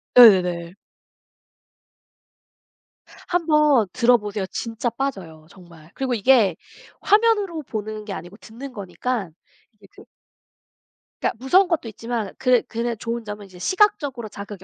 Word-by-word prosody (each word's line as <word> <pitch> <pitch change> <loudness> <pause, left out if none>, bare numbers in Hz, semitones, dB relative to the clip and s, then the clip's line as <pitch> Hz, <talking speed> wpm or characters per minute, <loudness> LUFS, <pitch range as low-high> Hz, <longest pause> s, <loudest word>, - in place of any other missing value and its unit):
네네네. 180 -7 +6 2.5
1 350 -1 0
번 300 -8 +4
들어보세요. 215 -5 +2
진짜 230 +1 -3
빠져요 190 - -5
정말. 170 -4 -17
그리고 265 -2 -2
이게 225 -5 +4 0.5
화면으로 415 -6 +2
보는 215 -3 -6
게 205 - -5
아니고 175 +4 -9
듣는 250 +5 -10
거니까 200 +1 -4 0.4
이게 210 -2 -21
듣 - - -16 1.2
그니까 - - 0
무서운 360 +9 +4
것도 330 -8 -1
있지만 225 -1 -4
그게 250 -2 +3
그냥 235 +1 -3
좋은 230 +1 -4
점은 210 -1 -7
이제 185 -2 -15
시각적으로 280 - +1
자극이 200 -1 -9
225 Hz, 280 characters per minute, -22 LUFS, 200-265 Hz, 2.5 s, 네네네